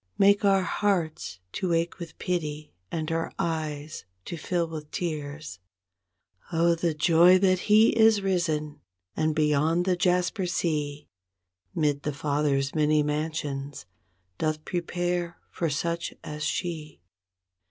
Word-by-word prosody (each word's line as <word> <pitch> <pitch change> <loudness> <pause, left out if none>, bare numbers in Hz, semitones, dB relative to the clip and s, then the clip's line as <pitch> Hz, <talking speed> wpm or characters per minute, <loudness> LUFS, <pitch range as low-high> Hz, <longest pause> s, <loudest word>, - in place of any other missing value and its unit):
Make 200 +1 +5
our 195 -1 +4
hearts 170 - -1
to 180 - -1
ache 165 +2 0
with 170 -2 -8
pity, 155 - -3 0.2
and 160 0 -2
our 165 0 -1
eyes 155 -2 -3 0.2
to - - -5
fill 170 +1 -1
with 155 -2 -7
tears. 150 - -4 0.9
Oh, 170 0 +3
the 165 -1 -1
joy 170 +4 +6
that 185 -1 +3
He 215 +2 +7
is 220 -2 +5
risen, 155 -6 -1 0.3
and 155 -1 0
beyond 155 +3 +2
the 185 -1 +2
jasper 180 +2 +1
sea 150 -4 -2 0.7
'Mid 145 -2 +1
the 150 - -3
Father's 140 -1 0
many 150 -1 +3
mansions, 150 - -3 0.5
doth 155 0 -1
prepare 175 0 -2
for 165 - -1
such 170 +4 -2
as 150 0 -6
she. 155 -1 -3
160 Hz, 125 wpm, -27 LUFS, 150-175 Hz, 0.9 s, He